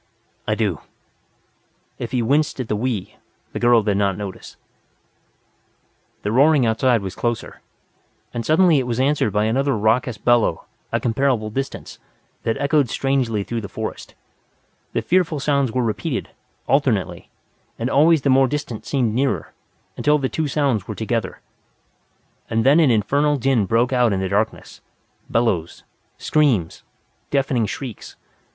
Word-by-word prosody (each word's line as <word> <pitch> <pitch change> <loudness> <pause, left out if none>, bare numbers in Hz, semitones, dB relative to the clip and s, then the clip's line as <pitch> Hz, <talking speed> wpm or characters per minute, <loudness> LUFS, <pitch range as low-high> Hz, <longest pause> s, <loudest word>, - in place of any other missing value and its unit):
"I - - +1
do." - - -1 1.2
If 120 - -5
he 125 -2 0
winced 145 +4 +1
at 125 - -3
the 105 - -1
"we" 110 -3 -3 0.4
the - - -3
girl 120 -2 +4
did 100 -2 0
not 100 -2 +1
notice. 100 -3 -8 1.7
The 105 - -1
roaring 140 +2 +4
outside 115 0 +2
was 95 - -5
closer. 120 -1 -4 0.7
And 120 - -3
suddenly 160 +1 +4
it 130 - -3
was 120 0 -2
answered 135 -5 +1
by 105 +1 +1
another 135 +3 +1
raucous 110 +2 +1
bellow, 115 -6 +2 0.3
at - - -1
considerable 120 -2 0
distance, 135 +4 -5 0.4
that 115 - -1
echoed 140 -2 +2
strangely 125 -6 0
through 115 +2 -4
the 100 - -7
forest. - - -6 0.8
The - - -1
fearful 170 -4 +1
sounds 140 -3 +1
were 125 +2 0
repeated, 105 -5 -2 0.4
alternately. - - 0 0.5
And 115 - -2
always 150 +2 +4
the 140 - +3
more 135 0 +5
distant 145 -5 -5
seemed 125 -6 0
nearer, 125 - -1 0.4
until 150 0 +2
the 135 -3 -2
two 160 -1 -2
sounds 135 -9 0
were - - -5
together. - - -3 1.1
And 110 0 +1
then 140 +5 +5
an 155 -5 +5
infernal 140 +7 +2
din 125 -6 +1
broke 120 +5 +2
out 120 -4 +3
in 95 - -1
the 95 0 -2
darkness. 105 +3 -2 0.5
Bellows. 100 -9 -1 0.3
Screams. 130 - +1 0.5
Deafening 135 -5 +1
shrieks. 125 -4 -7
125 Hz, 145 wpm, -21 LUFS, 110-140 Hz, 1.7 s, more